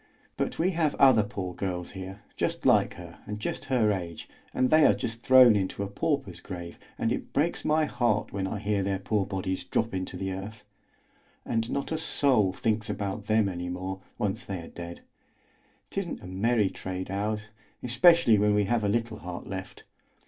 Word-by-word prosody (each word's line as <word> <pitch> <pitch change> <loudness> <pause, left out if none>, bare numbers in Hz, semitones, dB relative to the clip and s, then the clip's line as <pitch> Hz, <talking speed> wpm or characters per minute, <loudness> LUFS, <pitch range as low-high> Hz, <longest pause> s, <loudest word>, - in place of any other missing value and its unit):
But - - -2
we 180 +3 +2
have 165 -4 +1
other 130 -5 +6
poor 95 -3 -4
girls 90 -1 -3
here, 95 0 -8
just - - -2
like - - +4
her - - -11
and 105 0 -4
just 120 - -4
her 125 -6 +2
age, 85 -5 -4 0.2
and 130 - +1
they 155 0 +6
are - - +6
just 115 0 -4
thrown 130 -3 +7
into 100 0 -1
a - - -3
pauper's 100 - -2
grave, 85 -3 -8 0.2
and 115 - 0
it - - -4
breaks 155 +5 +1
my 155 0 +3
heart 120 -6 0
when 95 -1 -1
I 100 - -3
hear 105 0 0
their 95 0 0
poor 100 0 -1
bodies 95 -1 -3
drop 115 - -1
into 95 -1 -4
the 95 +1 -3
earth. 100 +3 -7 0.8
And 115 0 -1
not 140 +2 -2
a 160 - 0
soul 130 -11 +3
thinks 110 +2 -1
about 100 +1 -3
them 110 -1 +3
any 90 -2 -4
more, 95 +2 -4 0.2
once 100 -2 -1
they 95 -2 -5
are - - -10
dead! 85 0 -8 0.9
'Tisn't 180 - -4
a - - -8
merry 100 +3 +1
trade, 95 0 -5
ours, 105 +2 -1 0.4
especially 125 - +5
when 105 0 +3
we 105 - +3
have 110 +2 0
a 100 - +1
little 115 0 -1
heart 90 0 -7
left. 95 -1 -7
105 Hz, 190 wpm, -28 LUFS, 95-120 Hz, 0.9 s, thrown